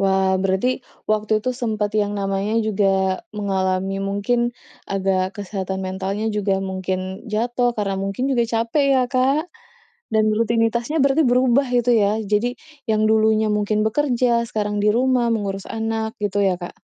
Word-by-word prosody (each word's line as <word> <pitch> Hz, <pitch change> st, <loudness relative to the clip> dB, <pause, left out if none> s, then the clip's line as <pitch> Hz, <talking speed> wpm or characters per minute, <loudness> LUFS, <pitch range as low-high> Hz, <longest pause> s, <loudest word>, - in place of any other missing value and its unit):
Wah, 190 Hz, -1 st, +2 dB
berarti 190 Hz, +5 st, +1 dB, 0.4 s
waktu 215 Hz, 0 st, 0 dB
itu 255 Hz, -, -1 dB
sempat 215 Hz, -4 st, -1 dB
yang 205 Hz, -1 st, +1 dB
namanya 195 Hz, +3 st, 0 dB
juga 195 Hz, -3 st, +1 dB
mengalami 195 Hz, -2 st, -1 dB
mungkin 240 Hz, +5 st, 0 dB, 0.3 s
agak 190 Hz, -1 st, 0 dB
kesehatan 190 Hz, -1 st, -4 dB
mentalnya 190 Hz, +3 st, -3 dB
juga 195 Hz, -2 st, 0 dB
mungkin 190 Hz, +1 st, -4 dB
jatuh 240 Hz, +2 st, +1 dB
karena 200 Hz, -2 st, -1 dB
mungkin 195 Hz, +7 st, -2 dB
juga 245 Hz, -3 st, +2 dB
capek 230 Hz, +5 st, 0 dB
ya, 265 Hz, -, +4 dB
Kak? 270 Hz, +6 st, +1 dB, 0.7 s
Dan 215 Hz, 0 st, +3 dB
rutinitasnya 235 Hz, +5 st, +1 dB
berarti 280 Hz, +2 st, +3 dB
berubah 250 Hz, +2 st, +3 dB
itu 245 Hz, 0 st, +2 dB
ya? 210 Hz, +2 st, +1 dB
Jadi 210 Hz, +4 st, 0 dB, 0.3 s
yang 215 Hz, -2 st, +1 dB
dulunya 220 Hz, 0 st, +3 dB
mungkin 210 Hz, 0 st, +1 dB
bekerja, 240 Hz, -1 st, +1 dB
sekarang 210 Hz, -1 st, -2 dB
di 205 Hz, +1 st, +2 dB
rumah 250 Hz, 0 st, +2 dB
mengurus 195 Hz, -2 st, -3 dB
anak 225 Hz, 0 st, -3 dB
gitu 205 Hz, -1 st, -1 dB
ya, 185 Hz, -, +2 dB
Kak? 175 Hz, -, -7 dB
215 Hz, 145 wpm, -21 LUFS, 195-235 Hz, 0.7 s, ya